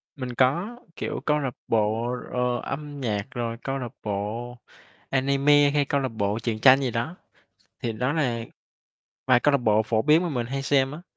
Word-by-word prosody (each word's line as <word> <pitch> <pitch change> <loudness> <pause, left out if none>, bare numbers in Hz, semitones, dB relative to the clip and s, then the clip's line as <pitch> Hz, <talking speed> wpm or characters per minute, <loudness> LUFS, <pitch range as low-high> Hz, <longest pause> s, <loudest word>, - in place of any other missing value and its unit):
Mình 130 -3 -5
có, 170 - +1 0.2
kiểu, - - -4
câu 150 0 +2
lạc 130 -4 -3
bộ, 115 +2 +1 0.2
ờ, 125 -1 0
âm 145 -1 -6
nhạc 105 -4 -1
rồi 115 -2 -3
câu 135 0 -2
lạc 120 -3 -5
bộ 110 +4 -4 0.5
anime 140 +2 +4
hay 145 0 +2
câu 140 0 0
lạc 130 - -1
bộ 105 -1 -1
truyện 115 -2 -2
tranh 135 +2 +7
gì 130 -3 0
đó. 120 +10 -3 0.6
Thì 115 - -2
đó 125 +5 -1
là 130 -7 0 0.9
vài 125 -2 +5
câu 145 - +3
lạc 140 - +4
bộ 110 -2 +3
phổ 110 0 0
biến 155 +3 +5
mà 175 - -1
mình 120 -6 -2
hay 135 +2 -3
xem 135 0 +2
á. 165 +4 -8
130 Hz, 195 wpm, -25 LUFS, 115-140 Hz, 0.9 s, tranh